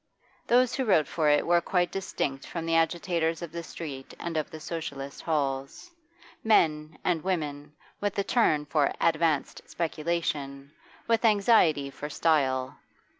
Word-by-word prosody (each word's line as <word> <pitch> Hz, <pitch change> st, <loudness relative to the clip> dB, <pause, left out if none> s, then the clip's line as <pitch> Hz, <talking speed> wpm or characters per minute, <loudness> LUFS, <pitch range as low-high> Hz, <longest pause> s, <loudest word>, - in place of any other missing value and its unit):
Those 250 Hz, +1 st, +4 dB
who 265 Hz, -, 0 dB
wrote 160 Hz, -9 st, +3 dB
for 155 Hz, -3 st, +1 dB
it 145 Hz, 0 st, +3 dB
were 175 Hz, 0 st, +4 dB
quite 175 Hz, 0 st, 0 dB
distinct 145 Hz, -8 st, -3 dB
from 165 Hz, -1 st, -5 dB
the 165 Hz, 0 st, +1 dB
agitators 165 Hz, 0 st, 0 dB
of 170 Hz, -, -7 dB
the 170 Hz, +1 st, -5 dB
street 145 Hz, -5 st, -8 dB
and 170 Hz, -1 st, -4 dB
of 155 Hz, -1 st, -1 dB
the 155 Hz, -, -9 dB
Socialist 140 Hz, -4 st, -6 dB
halls; 140 Hz, -, -2 dB, 0.5 s
men 155 Hz, -8 st, +2 dB
and 170 Hz, -4 st, 0 dB
women 150 Hz, -5 st, -3 dB, 0.2 s
with 205 Hz, -1 st, -2 dB
a 200 Hz, -, +2 dB
turn 155 Hz, -11 st, +2 dB
for 145 Hz, 0 st, +1 dB
'advanced' 160 Hz, -3 st, +1 dB
speculation, 150 Hz, -4 st, -3 dB, 0.4 s
with 230 Hz, 0 st, +2 dB
anxiety 200 Hz, -10 st, +4 dB
for 150 Hz, +2 st, -7 dB
style. 135 Hz, -5 st, +1 dB
160 Hz, 145 wpm, -28 LUFS, 145-175 Hz, 0.5 s, Those